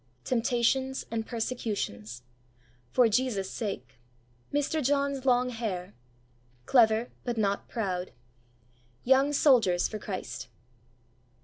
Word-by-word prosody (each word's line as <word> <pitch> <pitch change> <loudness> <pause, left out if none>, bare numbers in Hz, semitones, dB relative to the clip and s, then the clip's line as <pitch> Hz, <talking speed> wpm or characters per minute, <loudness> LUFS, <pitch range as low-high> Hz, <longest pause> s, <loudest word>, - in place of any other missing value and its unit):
Temptations 250 +2 +1
and 225 -1 -2
persecutions. 200 - -3 0.7
"For 245 - +4
Jesus' 220 -4 0
sake." 135 - -5 0.5
Mr. 290 +2 0
John's 280 0 0
long 250 0 +4
hair. 205 -5 -4 0.7
Clever, 225 - +4
but 240 -2 -3
not 200 -2 0
proud. 185 -6 -2 0.9
Young 265 +3 +4
soldiers 235 - +4
for 215 - -6
Christ. 130 - -5
230 Hz, 95 wpm, -29 LUFS, 195-255 Hz, 0.9 s, For